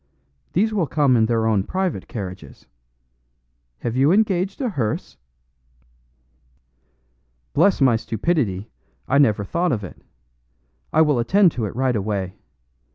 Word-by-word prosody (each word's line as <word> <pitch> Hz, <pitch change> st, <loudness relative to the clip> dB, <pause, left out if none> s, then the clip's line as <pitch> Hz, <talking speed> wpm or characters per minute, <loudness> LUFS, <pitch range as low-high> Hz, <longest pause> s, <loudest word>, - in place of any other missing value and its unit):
These 215 Hz, +5 st, +1 dB
will 185 Hz, -7 st, 0 dB
come 140 Hz, -4 st, +2 dB
in 110 Hz, -2 st, +3 dB
their 115 Hz, -1 st, +1 dB
own 110 Hz, -3 st, +2 dB
private 185 Hz, -, -3 dB
carriages. 95 Hz, -6 st, -8 dB, 1.2 s
Have 120 Hz, 0 st, -3 dB
you 135 Hz, +4 st, +4 dB
engaged 195 Hz, -2 st, +1 dB
a 260 Hz, -3 st, -1 dB
hearse?" 120 Hz, -, -3 dB, 2.4 s
"Bless 185 Hz, +6 st, +3 dB
my 130 Hz, -4 st, +5 dB
stupidity, 115 Hz, -, -2 dB, 0.4 s
I 140 Hz, -, +3 dB
never 110 Hz, -7 st, +3 dB
thought 170 Hz, -, -1 dB
of 110 Hz, -5 st, -2 dB
it! 90 Hz, -, -10 dB, 0.9 s
I 160 Hz, -, +5 dB
will 145 Hz, -5 st, +2 dB
attend 185 Hz, -, +4 dB
to 115 Hz, -6 st, -3 dB
it 100 Hz, -, -6 dB
right 130 Hz, -1 st, +1 dB
away. 100 Hz, -3 st, -2 dB
130 Hz, 130 wpm, -22 LUFS, 110-175 Hz, 2.4 s, my